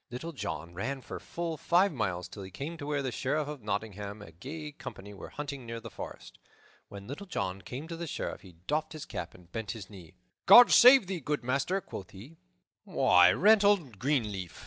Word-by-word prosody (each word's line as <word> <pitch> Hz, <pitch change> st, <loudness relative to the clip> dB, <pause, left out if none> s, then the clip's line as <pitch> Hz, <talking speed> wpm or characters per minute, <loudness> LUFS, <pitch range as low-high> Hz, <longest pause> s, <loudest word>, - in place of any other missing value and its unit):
Little 125 Hz, +8 st, -6 dB
John 85 Hz, -, -5 dB
ran 130 Hz, +9 st, -3 dB
for -, -, -7 dB
full 170 Hz, -2 st, -4 dB
five 180 Hz, +4 st, +3 dB
miles 95 Hz, -8 st, -2 dB
till 100 Hz, -, -10 dB
he 95 Hz, -, -8 dB
came 140 Hz, -, -6 dB
to 145 Hz, -2 st, -7 dB
where 145 Hz, -2 st, -1 dB
the 130 Hz, -, -2 dB
Sheriff 145 Hz, +4 st, -1 dB
of 150 Hz, -3 st, -6 dB
Nottingham 105 Hz, 0 st, -4 dB
and -, -, -11 dB
a -, -, -18 dB
gay 150 Hz, -, -7 dB
company 105 Hz, -7 st, -9 dB
were 100 Hz, -, -9 dB
hunting 140 Hz, -2 st, -6 dB
near 115 Hz, 0 st, -6 dB
the 115 Hz, -1 st, -10 dB
forest. -, -, -9 dB, 0.5 s
When 100 Hz, -1 st, -10 dB
Little 145 Hz, -, -7 dB
John 95 Hz, -, -3 dB
came 125 Hz, -, -7 dB
to 165 Hz, -, -6 dB
the 170 Hz, 0 st, -5 dB
Sheriff -, -, -4 dB
he 95 Hz, -3 st, -14 dB
doffed 155 Hz, +2 st, -1 dB
his 155 Hz, -, -7 dB
cap -, -, -6 dB
and 90 Hz, -1 st, -18 dB
bent 110 Hz, -2 st, -4 dB
his 100 Hz, -1 st, -10 dB
knee. 90 Hz, -6 st, -13 dB, 0.3 s
"God 245 Hz, 0 st, +10 dB
save 255 Hz, -2 st, +8 dB
thee, 185 Hz, -1 st, -3 dB
good 150 Hz, -1 st, -2 dB
master," 140 Hz, +10 st, 0 dB
quoth 95 Hz, -, -8 dB
he. 125 Hz, +12 st, -13 dB, 0.4 s
"Why, 90 Hz, 0 st, +5 dB
Reynold 200 Hz, -, +4 dB
Greenleaf!" 105 Hz, -, -1 dB
130 Hz, 205 wpm, -30 LUFS, 100-155 Hz, 0.5 s, God